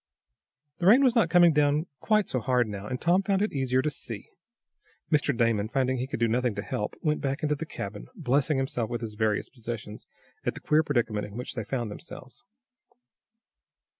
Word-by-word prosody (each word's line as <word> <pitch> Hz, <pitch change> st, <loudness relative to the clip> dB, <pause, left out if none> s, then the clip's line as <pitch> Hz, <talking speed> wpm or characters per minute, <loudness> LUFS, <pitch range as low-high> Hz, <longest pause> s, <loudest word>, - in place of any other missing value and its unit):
The 175 Hz, -, +1 dB
rain 245 Hz, +7 st, +7 dB
was 255 Hz, -3 st, +5 dB
not 230 Hz, -9 st, +3 dB
coming 175 Hz, -1 st, +6 dB
down 150 Hz, +1 st, +2 dB
quite 215 Hz, -3 st, +2 dB
so 130 Hz, -, -1 dB
hard 125 Hz, +1 st, +1 dB
now, 100 Hz, -1 st, -6 dB
and 125 Hz, +1 st, -3 dB
Tom 175 Hz, +3 st, +3 dB
found 195 Hz, 0 st, +1 dB
it 215 Hz, -, -1 dB
easier 130 Hz, -2 st, +1 dB
to 150 Hz, -, +1 dB
see. 115 Hz, -7 st, -7 dB, 0.8 s
Mr. 145 Hz, -4 st, +2 dB
Damon, 115 Hz, -3 st, +1 dB
finding 130 Hz, +1 st, +1 dB
he 125 Hz, +1 st, -2 dB
could 135 Hz, -, -4 dB
do 115 Hz, -, +3 dB
nothing 120 Hz, -1 st, 0 dB
to 100 Hz, -, -4 dB
help, 105 Hz, 0 st, -3 dB
went 150 Hz, -1 st, +1 dB
back 140 Hz, +2 st, -2 dB
into 150 Hz, 0 st, +2 dB
the 155 Hz, +2 st, -5 dB
cabin, -, -, -6 dB
blessing 140 Hz, +3 st, +1 dB
himself 130 Hz, -4 st, -1 dB
and 120 Hz, -1 st, -2 dB
his 110 Hz, -2 st, -5 dB
various 105 Hz, -1 st, 0 dB
possessions 115 Hz, -3 st, -7 dB, 0.4 s
at -, -, -1 dB
the -, -, -7 dB
queer 155 Hz, +1 st, +3 dB
predicament 120 Hz, -9 st, -1 dB
in 105 Hz, +2 st, -10 dB
which 125 Hz, -, -5 dB
they 115 Hz, -, -3 dB
found 120 Hz, -2 st, -3 dB
themselves. 130 Hz, -, -10 dB
130 Hz, 195 wpm, -27 LUFS, 115-150 Hz, 0.8 s, rain